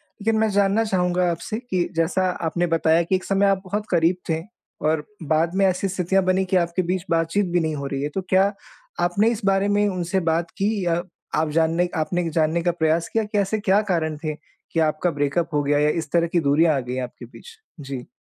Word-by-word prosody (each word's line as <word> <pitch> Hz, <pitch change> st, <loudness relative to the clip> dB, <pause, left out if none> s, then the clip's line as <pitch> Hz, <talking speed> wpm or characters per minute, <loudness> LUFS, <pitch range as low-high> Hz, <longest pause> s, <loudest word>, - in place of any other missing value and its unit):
लेकिन 220 Hz, +2 st, -3 dB
मैं 220 Hz, 0 st, +2 dB
जानना 200 Hz, +2 st, +2 dB
चाहूँगा 180 Hz, -3 st, +1 dB
आपसे 215 Hz, +6 st, -4 dB
कि 180 Hz, -2 st, 0 dB
जैसा 170 Hz, +3 st, +1 dB, 0.2 s
आपने 175 Hz, +2 st, 0 dB
बताया 165 Hz, 0 st, +3 dB
कि 190 Hz, -, 0 dB
एक 185 Hz, -, -2 dB
समय 195 Hz, 0 st, +2 dB
आप 195 Hz, -1 st, +2 dB
बहुत 205 Hz, +3 st, -3 dB
करीब 170 Hz, 0 st, +3 dB
थे 160 Hz, 0 st, 0 dB, 0.5 s
और 155 Hz, -1 st, 0 dB, 0.2 s
बाद 160 Hz, +3 st, +1 dB
में 195 Hz, 0 st, +3 dB
ऐसी 190 Hz, +1 st, +1 dB
स्थितियाँ 190 Hz, +1 st, +1 dB
बनीं 185 Hz, +1 st, +2 dB
कि 185 Hz, -, -1 dB
आपके 170 Hz, +1 st, 0 dB
बीच 180 Hz, +1 st, -2 dB
बातचीत 165 Hz, +5 st, +1 dB
भी 175 Hz, -, +4 dB
नहीं 160 Hz, -2 st, -1 dB
हो 140 Hz, -1 st, -4 dB
रही 135 Hz, 0 st, -3 dB
है। 145 Hz, -, -1 dB
तो 190 Hz, -, 0 dB
क्या 195 Hz, +1 st, +4 dB, 0.5 s
आपने 200 Hz, +5 st, +2 dB
इस 230 Hz, -, -4 dB
बारे 195 Hz, 0 st, +2 dB
में 205 Hz, 0 st, +2 dB
उनसे 185 Hz, 0 st, -1 dB
बात 165 Hz, +1 st, -1 dB
की 200 Hz, -1 st, 0 dB
या 170 Hz, 0 st, +1 dB, 0.3 s
आप 155 Hz, 0 st, +1 dB
जानने 165 Hz, +2 st, +2 dB
एक 180 Hz, -, -4 dB
आपने 160 Hz, +3 st, 0 dB
एक -, -, -1 dB
जानने 160 Hz, +1 st, +1 dB
का 175 Hz, -, +2 dB
प्रयास 165 Hz, 0 st, 0 dB
किया 225 Hz, -, +2 dB
कि 210 Hz, 0 st, -3 dB
ऐसे 200 Hz, +2 st, +1 dB
क्या 205 Hz, 0 st, +3 dB
कारण 160 Hz, -3 st, 0 dB
थे 155 Hz, -1 st, -2 dB, 0.4 s
कि 165 Hz, -, 0 dB
आपका 155 Hz, +3 st, -1 dB
ब्रेकअप 145 Hz, +3 st, -1 dB
हो 145 Hz, -1 st, +1 dB
गया 145 Hz, +1 st, +2 dB
या 150 Hz, 0 st, +3 dB
इस 155 Hz, -2 st, -11 dB
तरह 170 Hz, -1 st, +2 dB
की 170 Hz, +1 st, +1 dB
दूरियाँ 155 Hz, +1 st, +3 dB
आ -, -, +1 dB
गईं 125 Hz, 0 st, -4 dB
आपके 125 Hz, 0 st, -8 dB
बीच? 455 Hz, -, -14 dB, 0.3 s
जी। 135 Hz, -3 st, -6 dB
175 Hz, 230 wpm, -23 LUFS, 160-195 Hz, 0.5 s, भी